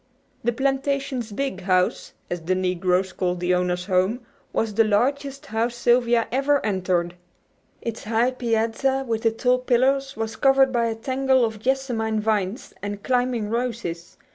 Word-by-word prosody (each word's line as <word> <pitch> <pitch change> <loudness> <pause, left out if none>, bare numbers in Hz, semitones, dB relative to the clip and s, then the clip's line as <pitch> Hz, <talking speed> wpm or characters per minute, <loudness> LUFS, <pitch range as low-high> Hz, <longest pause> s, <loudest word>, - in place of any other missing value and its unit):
The 240 - +2
plantation's 270 -2 -1
"big 205 -4 -3
house," 185 -1 +1
as 175 -1 -4
the 180 +3 0
negroes 185 0 0
called 180 -1 -1
the 180 +1 +1
owner's 180 0 0
home, 190 +5 +1 0.3
was 220 -1 -1
the 225 +2 +4
largest 275 +6 0
house 230 +1 -1
Sylvia 240 0 +3
had - - -6
ever 275 +2 +2
entered. 185 -4 0 0.7
Its 230 -1 -5
high 230 +3 +2
piazza 250 +2 0
with 225 -1 -1
the 225 -1 +3
tall 250 +3 +1
pillars 270 +2 +1
was 225 0 -3
covered 270 -1 +4
by 235 -2 +1
a 225 - -2
tangle 260 +2 +2
of 220 -1 -4
jessamine 235 -3 0
vines 210 0 -1
and 205 0 -5
climbing 245 -4 0
roses. 230 -8 -3
230 Hz, 155 wpm, -24 LUFS, 200-260 Hz, 0.7 s, the